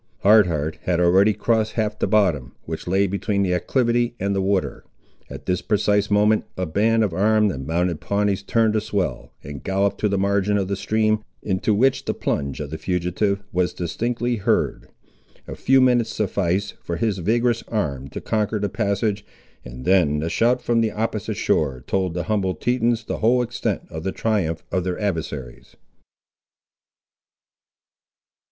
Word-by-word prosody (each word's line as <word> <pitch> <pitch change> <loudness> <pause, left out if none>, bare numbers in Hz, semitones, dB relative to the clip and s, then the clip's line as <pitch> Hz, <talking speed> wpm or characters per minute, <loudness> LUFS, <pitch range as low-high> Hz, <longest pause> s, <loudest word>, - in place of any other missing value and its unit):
Hard 105 -1 +6
Heart 80 -2 -2
had 90 -1 +1
already 95 +4 +5
crossed 110 0 0
half 110 -1 -2
the - - +1
bottom, 90 - +1
which 80 +1 -6
lay 95 +3 +2
between 100 +1 -1
the 90 -2 +1
acclivity 120 +4 +1
and 100 +1 -1
the 95 - +1
water. 95 0 -1 0.5
At - - -9
this 90 -1 0
precise 105 -1 +1
moment 105 +1 +3
a 95 - -1
band 110 +7 +2
of 100 -5 -1
armed 105 +3 +3
and 65 -4 -6
mounted 85 0 0
Pawnees 100 -1 0
turned 110 +1 +1
a 110 - +2
swell, 105 -3 -3
and 70 -1 -8
galloped 100 +1 0
to 105 - +1
the 100 - 0
margin 100 +1 +1
of 95 -2 -1
the 100 - 0
stream, 110 +1 0 0.2
into 100 +2 0
which 130 +5 +2
the - - -2
plunge 70 -1 -2
of 75 -1 -5
the 80 - -5
fugitive 95 +3 -1
was 90 0 0
distinctly 120 +7 -2
heard. 100 - 0 0.6
A - - -6
few 135 0 +3
minutes 125 -3 +3
sufficed 100 -1 -1
for 85 - -4
his 100 +2 -1
vigorous 115 +5 +1
arm 70 - -2
to - - -7
conquer 105 0 -1
the 100 -1 -1
passage, 100 -1 -1 0.4
and 60 +1 -9
then 90 -6 +3
the 80 +2 -2
shout 125 +2 +2
from 115 -1 +2
the 110 - +1
opposite 110 -1 -3
shore 65 -5 0
told 95 -3 -1
the 90 - -1
humbled 95 -3 -1
Tetons 120 -2 +1
the - - -4
whole 125 +3 +3
extent 120 +1 -3
of 80 - -5
the 95 +3 -2
triumph 95 -9 -1
of 90 0 0
their 90 -1 -3
adversaries. 75 - -4
100 Hz, 170 wpm, -22 LUFS, 90-110 Hz, 0.6 s, Hard